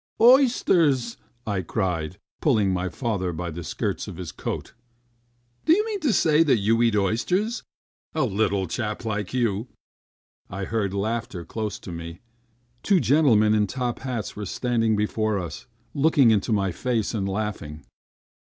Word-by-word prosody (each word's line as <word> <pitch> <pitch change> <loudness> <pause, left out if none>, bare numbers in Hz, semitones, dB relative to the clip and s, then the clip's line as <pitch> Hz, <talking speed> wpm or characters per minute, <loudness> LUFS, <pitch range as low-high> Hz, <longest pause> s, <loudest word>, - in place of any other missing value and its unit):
"Oysters!" 185 - +4 0.3
I 100 -3 -1
cried, 90 -2 -2 0.2
pulling 105 -10 +3
my 90 0 -1
father 100 -7 -2
by 85 +1 -4
the 85 +2 -6
skirts - - -3
of - - -8
his - - -6
coat. - - -5 0.9
"Do 320 - +6
you 420 +5 +2
mean 430 -2 -3
to 295 -8 +1
say 160 -5 +4
you 115 -7 +3
eat 115 -2 +3
oysters? 180 - 0 0.5
A 155 - +2
little 100 -4 +1
chap 105 +5 -4
like 105 -3 -2
you!" 115 -3 0 0.8
I 95 +2 -5
heard 100 -2 -1
laughter 110 -3 -3
close 105 +2 -4
to 90 - -9
me. 85 0 -7 0.6
Two 195 -3 +3
gentlemen 120 -5 +4
in 105 -1 +2
top 125 +1 -3
hats 125 -5 -4
were 105 -1 -5
standing 115 0 0
before 105 0 0
us, 85 0 -6 0.3
looking 140 -4 +4
into 105 +1 +1
my 100 -3 +1
face 120 +2 -1
and 100 -3 -1
laughing. 95 -8 -4
110 Hz, 150 wpm, -24 LUFS, 95-130 Hz, 0.9 s, Do